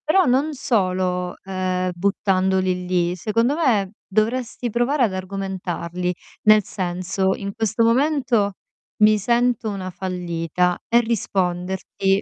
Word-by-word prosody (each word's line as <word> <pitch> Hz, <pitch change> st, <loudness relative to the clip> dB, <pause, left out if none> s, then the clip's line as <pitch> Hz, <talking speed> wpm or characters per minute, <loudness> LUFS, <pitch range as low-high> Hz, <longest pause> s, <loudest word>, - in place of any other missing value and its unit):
Però 370 Hz, +4 st, +4 dB
non 275 Hz, +5 st, +2 dB
solo, 185 Hz, -8 st, 0 dB
uhm, 185 Hz, -1 st, -1 dB
buttandoli 190 Hz, -1 st, +1 dB
lì. 180 Hz, -1 st, 0 dB
Secondo 230 Hz, -, +1 dB
me, 225 Hz, -, +1 dB, 0.2 s
dovresti 230 Hz, +4 st, -1 dB
provare 240 Hz, +5 st, +1 dB
ad 210 Hz, -5 st, +1 dB
argomentarli, 185 Hz, -2 st, -3 dB, 0.3 s
nel 215 Hz, 0 st, +6 dB
senso: 185 Hz, 0 st, -1 dB
"In 200 Hz, -1 st, -5 dB
questo 225 Hz, +1 st, 0 dB
momento 240 Hz, -4 st, +2 dB, 0.5 s
mi 215 Hz, 0 st, +6 dB
sento 235 Hz, +1 st, +1 dB
una 190 Hz, -2 st, -4 dB
fallita." 180 Hz, -1 st, -1 dB
E 235 Hz, -, +5 dB
risponderti: 190 Hz, -3 st, -1 dB
195 Hz, 115 wpm, -22 LUFS, 185-230 Hz, 0.5 s, nel